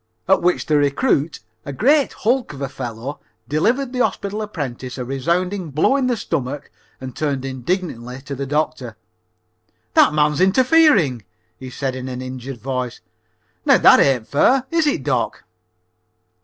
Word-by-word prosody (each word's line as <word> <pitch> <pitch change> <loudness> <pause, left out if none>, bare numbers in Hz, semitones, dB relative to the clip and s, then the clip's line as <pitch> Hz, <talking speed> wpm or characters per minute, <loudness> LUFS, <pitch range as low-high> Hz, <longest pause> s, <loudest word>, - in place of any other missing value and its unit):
At 190 - +4
which 180 +1 +1
the 150 - +2
recruit, 145 - +1 0.2
a 140 - -6
great 275 - +2
hulk 245 - 0
of 140 - -10
a - - -1
fellow, 125 +1 -6 0.3
delivered 245 - 0
the 250 - -3
hospital 205 +2 -2
apprentice 130 - -5
a 125 - -4
resounding 170 +7 -1
blow 155 - +2
in 270 -2 +1
the 245 -2 0
stomach 140 -6 -4 0.3
and 130 -1 -8
turned 140 -4 -2
indignantly 130 -2 -3
to 140 +1 -7
the 140 0 -4
doctor. 145 -6 -2 1.0
"That - - +5
man's 150 0 +1
interfering," 205 - +4 0.3
he 130 - -9
said 130 0 -3
in 130 0 -6
an 125 -1 -5
injured 130 0 -7
voice. 130 -1 -3 0.6
"Now - - +5
that - - +7
ain't 130 -5 +2
fair, 255 - +3
is 330 -2 +2
it, 290 - 0
doc?" - - -1
145 Hz, 155 wpm, -20 LUFS, 130-200 Hz, 1.0 s, that